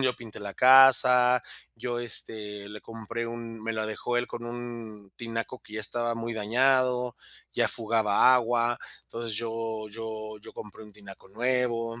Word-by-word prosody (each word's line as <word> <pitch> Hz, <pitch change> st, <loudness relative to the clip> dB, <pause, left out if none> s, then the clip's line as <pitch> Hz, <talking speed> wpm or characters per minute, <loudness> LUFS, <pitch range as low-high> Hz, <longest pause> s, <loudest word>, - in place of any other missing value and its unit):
yo 130 Hz, -2 st, +2 dB
pinté 115 Hz, -3 st, -11 dB
la 100 Hz, -1 st, -7 dB
casa, 125 Hz, -2 st, +7 dB, 0.3 s
yo, 120 Hz, +1 st, -4 dB
este, 105 Hz, -3 st, -3 dB
le 105 Hz, 0 st, -9 dB
compré 115 Hz, +1 st, -6 dB
un 115 Hz, -1 st, -7 dB
Me 115 Hz, +1 st, -3 dB
la 110 Hz, 0 st, -2 dB
dejó 115 Hz, +3 st, -3 dB
él 120 Hz, -, 0 dB
con 120 Hz, -, -7 dB
un 115 Hz, -4 st, -7 dB
tinaco 115 Hz, +1 st, -5 dB
que 105 Hz, -, -17 dB
ya 110 Hz, -, -2 dB
estaba 120 Hz, +2 st, -1 dB
muy 115 Hz, 0 st, -4 dB
dañado, 125 Hz, +2 st, +2 dB, 0.4 s
ya -, -, +2 dB
fugaba 110 Hz, +1 st, +3 dB
agua. 120 Hz, -1 st, +1 dB, 0.3 s
Entonces 115 Hz, -2 st, -2 dB
yo 115 Hz, -2 st, -3 dB
yo 110 Hz, -1 st, -6 dB
yo -, -, -12 dB
compré 105 Hz, +1 st, -10 dB
un 105 Hz, -, -14 dB
tinaco 100 Hz, -2 st, -11 dB
nuevo, 120 Hz, 0 st, -1 dB
115 Hz, 160 wpm, -27 LUFS, 110-120 Hz, 0.4 s, casa